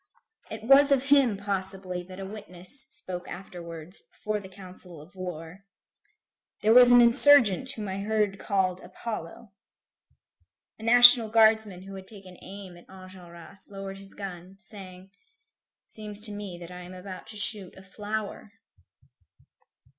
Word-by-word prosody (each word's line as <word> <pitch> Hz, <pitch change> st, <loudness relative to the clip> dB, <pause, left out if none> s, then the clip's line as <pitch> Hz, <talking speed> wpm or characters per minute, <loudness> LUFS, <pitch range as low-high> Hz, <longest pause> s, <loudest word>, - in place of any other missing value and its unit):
It 220 Hz, 0 st, -9 dB
was 275 Hz, +4 st, +4 dB
of 270 Hz, -2 st, +2 dB
him, 270 Hz, -7 st, +3 dB
possibly, 190 Hz, -2 st, -6 dB
that 185 Hz, +1 st, -13 dB
a 195 Hz, -, -7 dB
witness 200 Hz, +5 st, -12 dB
spoke 185 Hz, -10 st, -10 dB
afterwards, 170 Hz, -1 st, -11 dB
before 215 Hz, 0 st, -5 dB
the 190 Hz, -2 st, -13 dB
council 185 Hz, -3 st, -13 dB
of 155 Hz, +6 st, -17 dB
war: 180 Hz, 0 st, -10 dB, 1.0 s
"There 220 Hz, +1 st, +3 dB
was 245 Hz, 0 st, +6 dB
an 245 Hz, 0 st, +6 dB
insurgent 240 Hz, -2 st, +3 dB
whom 215 Hz, -2 st, -8 dB
I 190 Hz, +1 st, -6 dB
heard 205 Hz, -1 st, -2 dB
called 190 Hz, -3 st, -2 dB
Apollo." 215 Hz, -1 st, -9 dB, 1.3 s
A -, -, -13 dB
National 245 Hz, 0 st, +6 dB
Guardsman 220 Hz, -4 st, +1 dB
who 195 Hz, 0 st, -12 dB
had 190 Hz, -1 st, -11 dB
taken 195 Hz, -3 st, -15 dB
aim 190 Hz, -2 st, -12 dB
at 175 Hz, -, -20 dB
Enjolras, 185 Hz, -1 st, -15 dB
lowered 195 Hz, -1 st, -9 dB
his 195 Hz, 0 st, -16 dB
gun, 185 Hz, -2 st, -10 dB
saying: 190 Hz, -2 st, -15 dB, 0.8 s
"It -, -, -32 dB
seems 210 Hz, -1 st, -10 dB
to 215 Hz, -1 st, +7 dB
me 205 Hz, -3 st, -9 dB
that 175 Hz, 0 st, -12 dB
I 180 Hz, -, -10 dB
am 180 Hz, +1 st, -12 dB
about 185 Hz, 0 st, -11 dB
to 215 Hz, -, -7 dB
shoot 200 Hz, -2 st, +7 dB
a 190 Hz, -, -15 dB
flower." 205 Hz, +1 st, -8 dB
195 Hz, 145 wpm, -25 LUFS, 185-215 Hz, 1.3 s, to